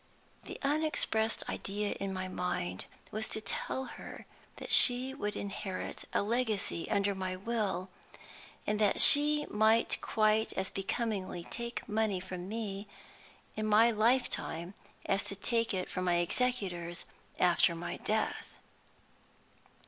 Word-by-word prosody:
The - - -7
unexpressed 275 -7 +1
idea 205 +1 -3
in 195 0 -3
my 185 0 -3
mind 95 - -3 0.3
was 220 +1 -2
to - - 0
tell 220 +5 -3
her - - -10 0.3
that - - -2
she 255 +2 +7
would 210 -7 -3
inherit 195 -1 -5
a - - +1
legacy 215 -6 -1
under 200 0 +1
my 185 -1 -3
will, 200 -2 -2 0.8
and 210 0 0
that 210 -2 +2
she 295 +1 +7
might 220 +2 +3
quite 215 0 +1
as 190 0 -2
becomingly 195 -3 -3
take 235 0 -5
money 215 -3 0
from 185 0 -7
me 210 -2 -4 0.7
in 215 0 -2
my 220 +3 +5
life 235 +4 +3
time 170 +4 -4 0.3
as 195 0 0
take 230 +3 0
it 185 -3 -2
from 185 - -4
my 175 -1 +2
executors 175 -3 -1 0.3
after 175 -1 +3
my 170 +1 -5
death. 215 +1 -2
210 Hz, 130 wpm, -32 LUFS, 185-230 Hz, 0.8 s, she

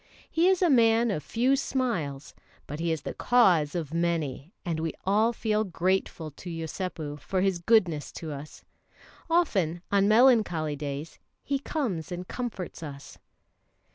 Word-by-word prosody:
He 330 +3 +3
is 375 -1 +3
a 350 - +4
man 230 -2 +4
of 155 - -2
few 250 - +1
smiles; 185 - -2 0.3
but 150 +2 -7
he 165 0 0
is 160 -3 -2
the - - -4
cause 180 -12 +3
of 160 -3 -3
many, 165 -3 -1
and 165 -3 -1
we 160 0 -2
all 215 +4 +3
feel 215 -2 0
grateful 180 -4 -1
to 175 +5 -10
Yosépu 165 -2 -5
for 185 +7 -1
his 190 -2 +1
goodness 170 -6 +2
to 160 -2 -6
us. 145 +1 -9 0.7
Often 190 - +1
on 200 0 +4
melancholy 215 - +4
days 145 +2 -6 0.2
he 280 -1 -1
comes 225 - -3
and 180 +1 -5
comforts 225 -9 -5
us. 140 -3 -9
180 Hz, 150 wpm, -27 LUFS, 155-225 Hz, 0.7 s, a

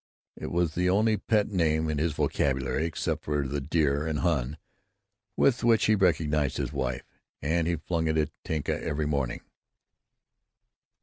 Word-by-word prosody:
It - - -6
was 85 -2 +1
the 90 +2 +1
only 110 +3 +3
pet 105 +1 +1
name 80 -4 +1
in 75 -2 -1
his 80 0 0
vocabulary, 70 +1 0
except 80 - -3
the 70 -1 -1
"dear" 75 +1 +1
and 80 -2 -1
"hon." 75 -4 0 0.8
with 130 -2 +3
which 115 -2 +4
he 110 - +4
recognized 75 - +1
his - - -3
wife, 65 -1 -2 0.3
and 80 +3 0
he 85 - +1
flung 80 +1 -2
it 80 0 +1
at 75 -1 +1
Tinka 80 -2 -2
every 75 +1 -1
morning. 70 -5 -1
80 Hz, 150 wpm, -28 LUFS, 75-85 Hz, 0.8 s, which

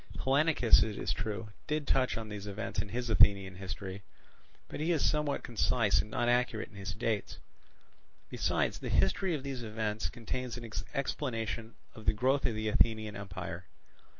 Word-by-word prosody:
Hellanicus, 140 -2 +4
it 105 -2 0
is - - -1
true, 110 0 -4 0.2
did 150 -1 -1
touch 130 -3 +2
on 110 -1 -5
these 105 -1 -6
events 105 +2 -2
in 105 - -7
his 120 +2 -2
Athenian 100 -4 +5
history; 95 +1 -6 0.7
but - - -7
he 160 +3 +1
is 160 -5 +3
somewhat 150 -2 0
concise 115 -2 +2
and 105 - -9
not 120 +2 0
accurate 120 -2 +1
in 105 - -17
his 95 0 -5
dates. 110 -7 -2 0.9
Besides, - - 0
the - - -4
history 170 - +2
of 140 - -5
these 135 -3 -4
events 110 -1 -2
contains 125 +1 -4
an 120 -1 -7 0.3
explanation 115 -4 -2 0.2
of 110 -2 -12
the - - +5
growth 130 +6 +2
of 115 - -2
the 110 0 -2
Athenian 110 -1 +2
empire. 90 -3 -6
110 Hz, 170 wpm, -32 LUFS, 105-125 Hz, 0.9 s, Athenian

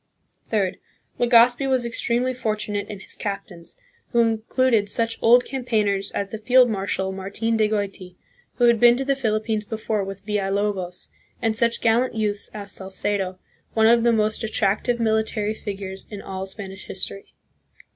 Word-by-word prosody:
Third. 200 -4 0 0.4
Legazpi 245 +2 +5
was 255 -2 +1
extremely 240 +2 0
fortunate 215 -4 -2
in 205 -2 -7
his - - -10
cap 200 -1 -4
tains, 170 - -12 0.3
who 235 - +1
included 225 -1 +2
such 230 +2 0
old 245 +2 +6
campaigners 215 -7 0
as 200 - -2
the 220 - -6
field 250 +2 +5
marshal 190 -1 -2
Martin 200 +4 -2
de 215 -1 +2
Goiti, 195 -4 -3 0.4
who 245 - -1
had 235 -1 +5
been 240 0 +7
to 270 - -2
the 275 - +2
Philippines 220 -4 -1
before 215 -1 -2
with 195 0 -8
Villalobos, 200 -3 -2 0.3
and 225 -1 0
such 235 +1 +1
gallant 235 +2 +2
youths 210 -2 0
as 200 -2 -6
Salcedo, 190 0 -2 0.4
one 220 -1 +4
of 230 +1 +6
the 235 - +4
most 215 0 +1
attractive 220 +2 0
military 220 -1 0
figures 195 -3 -6
in 205 - -7
all 190 -1 -6
Spanish 190 -1 -9
history. 195 +1 -6
215 Hz, 155 wpm, -23 LUFS, 200-235 Hz, 0.4 s, been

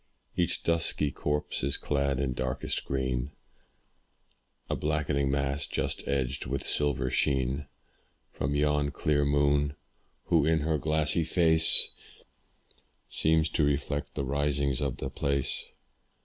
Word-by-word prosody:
Each 90 -2 0
dusky 80 -3 +1
copse 75 +3 -2
is 70 +1 0
clad 70 -2 -1
in 65 -2 -1
darkest 65 +1 -3
green: 65 0 -2 1.3
A - - -1
blackening 75 -2 -1
mass, 70 +1 0
just - - -2
edged 65 -1 -1
with 70 0 -3
silver 65 -3 0
sheen 65 +1 0 0.6
From 70 +1 -2
yon 75 0 +1
clear 75 +1 0
moon, 70 0 +2 0.5
who 80 -3 +2
in 80 0 +2
her 80 0 0
glassy 80 +2 0
face 80 -1 +5 1.2
Seems 80 0 +2
to 80 - 0
reflect 70 0 -1
the 70 - -2
risings 70 0 0
of 70 -4 -2
the 65 - -5
place. 70 0 0
70 Hz, 120 wpm, -28 LUFS, 70-75 Hz, 1.3 s, face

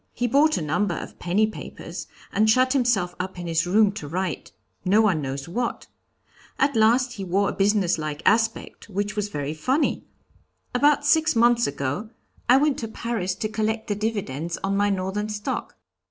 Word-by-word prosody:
He 245 - -1
bought 290 +6 +3
a - - -2
number 170 +5 0
of - - -8
penny 190 +5 +2
papers, 215 - -7 0.3
and 215 +2 +3
shut 255 +4 +4
himself 235 -10 +1
up 185 0 -4
in 175 - -6
his 165 0 0
room 205 +2 +4
to 195 -8 -7
write 175 -5 -3 0.3
no 195 +4 +4
one 195 -8 +3
knows 135 0 -4
what. 235 +7 -3 0.7
At 280 +1 +2
last 240 +3 +3
he 200 -5 -6
wore 195 +2 +1
a - - -3
business 195 -4 +2
like 155 -1 -4
aspect, 225 0 +1
which 205 +1 -2
was 210 -1 -2
very 145 -3 -3
funny. 260 - 0 0.7
About 290 +3 +3
six 315 0 +3
months 235 +1 +4
ago 140 +9 -3 0.4
I 255 - +8
went 290 0 +2
to 225 - -4
Paris 220 -5 -3
to 215 - -2
collect 220 +1 -2
the - - +2
dividends 185 -7 -3
on 195 0 0
my 205 +1 +2
Northern 195 +2 -2
stock." 210 0 -4
205 Hz, 180 wpm, -24 LUFS, 180-235 Hz, 0.7 s, I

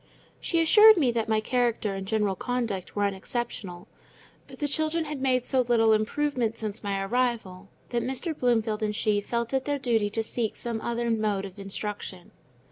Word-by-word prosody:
She 335 - 0
assured 425 +6 +8
me 270 -7 +3
that 230 -1 -2
my 220 -1 +3
character 235 -3 0
and 195 0 -5
general 210 -2 +1
conduct 230 -4 -3
were 205 - +1
unexceptionable; 195 -2 -4 0.6
but - - -12
the 290 - -1
children 315 +3 +1
had 295 -3 -5
made 255 -2 +2
so 260 -2 +2
little 230 -2 +3
improvement 230 +1 0
since 215 -1 -5
my 200 -1 -1
arrival 210 -4 -1 0.2
that 240 -1 0
Mr. 265 +7 -2
Bloomfield 225 -5 +1
and 210 -1 -1
she 205 -1 +1
felt 235 +3 -3
it 265 -1 0
their 290 -1 0
duty 230 -6 +1
to 225 +2 -1
seek 220 0 -2
some 230 -2 -4
other 235 0 -1
mode 210 -3 0
of 195 0 -10
instruction. 195 -2 -6
230 Hz, 180 wpm, -27 LUFS, 205-255 Hz, 0.6 s, assured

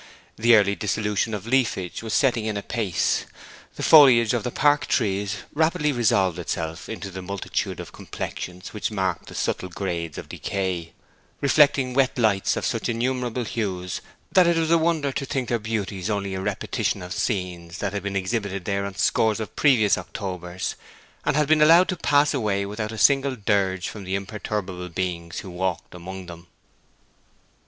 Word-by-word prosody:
The 115 - -3
yearly 105 -4 +6
dissolution 105 +1 -1
of 105 - -7
leafage 115 -8 0
was 110 -1 -2
setting 120 -5 +2
in 110 -2 -1
apace. 100 -3 -1 0.5
The - - -5
foliage 125 -7 +7
of 120 -3 0
the - - -1
park 145 +3 +2
trees 100 -3 0 0.2
rapidly 160 0 +2
resolved 100 - +2
itself 80 -1 -4
into 100 -3 -6
the 95 +1 -6
multitude 100 +1 -3
of - - -8
complexions 90 +1 -6
which 105 - -2
mark 95 -4 -2
the - - -10
subtle 90 - -2
grades 85 -4 -4
of - - -7
decay, 90 -4 -3 0.5
reflecting 140 -2 +4
wet 135 0 +2
lights 105 -5 +2
of - - -2
such - - -1
innumerable 125 +1 -1
hues 95 -6 -3 0.3
that 185 -2 +5
it 170 -1 +3
was 165 0 +1
a 170 - +6
wonder 160 -4 +1
to 135 - -3
think 130 -3 -2
their 120 - +1
beauties 105 -3 -3
only 100 -2 -2
a 95 - -3
repetition 95 - -2
of 90 - -5
scenes 90 -5 -3
that 100 -1 -3
had 100 - -2
been 100 +1 -4
exhibited 100 -1 -2
there 100 0 -1
on 100 - -8
scores 110 +2 +2
of 110 - -6
previous 120 -8 +4
Octobers, 90 -3 -5 0.5
and - - +1
had 150 -1 +2
been 155 0 +4
allowed 165 +4 +7
to 185 - 0
pass 145 -3 +3
away 105 -7 0
without 105 +2 -4
a 110 - -7
single 135 +3 +4
dirge 100 -4 0
from 105 - -7
the 95 +1 -2
imperturbable 95 -2 -4
beings 85 -1 -3
who 95 - -9
walked 90 -1 -3
among 95 +1 -8
them. 85 0 -11
105 Hz, 175 wpm, -24 LUFS, 95-125 Hz, 0.5 s, foliage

